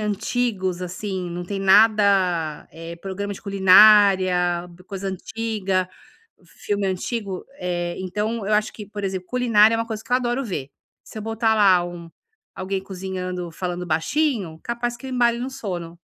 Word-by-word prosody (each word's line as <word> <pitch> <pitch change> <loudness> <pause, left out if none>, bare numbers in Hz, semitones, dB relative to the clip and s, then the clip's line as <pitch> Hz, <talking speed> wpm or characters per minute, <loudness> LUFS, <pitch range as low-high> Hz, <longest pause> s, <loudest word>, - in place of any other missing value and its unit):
antigos, 210 -3 -1
assim, 185 0 -4
não 175 +1 -5
tem 195 +2 -4
nada, 195 -6 +3
eh 165 +1 -8
programa 200 +1 -4
de - - -13
culinária, 190 -3 +5 0.2
coisa 195 -1 -5
antiga, 195 -1 -2 0.6
filme 205 -1 -3
antigo. 190 0 -3
Eh, 175 -1 -2
então 210 +4 -3
eu 215 - +1
acho 210 0 +1
que, 210 - -8
por 205 -1 -7
exemplo, 190 -1 -3
culinária 230 -3 +4
é - - -2
uma 230 - -1
coisa 220 -1 -6
que 235 - -16
eu - - +5
adoro 250 +1 -1
ver. 145 - -5 0.3
Se 215 - -9
eu - - -6
botar 225 +1 +1
lá 190 -5 +5
um 170 -1 -9 0.5
alguém 190 0 -3
cozinhando, 185 -2 -5
falando 180 +1 -4
baixinho, 185 - -1
capaz 235 0 -3
que 265 - -11
eu - - -5
embale 240 -2 +2
no 255 +2 -4
sono, 175 -9 -6
195 Hz, 160 wpm, -22 LUFS, 180-220 Hz, 0.6 s, culinária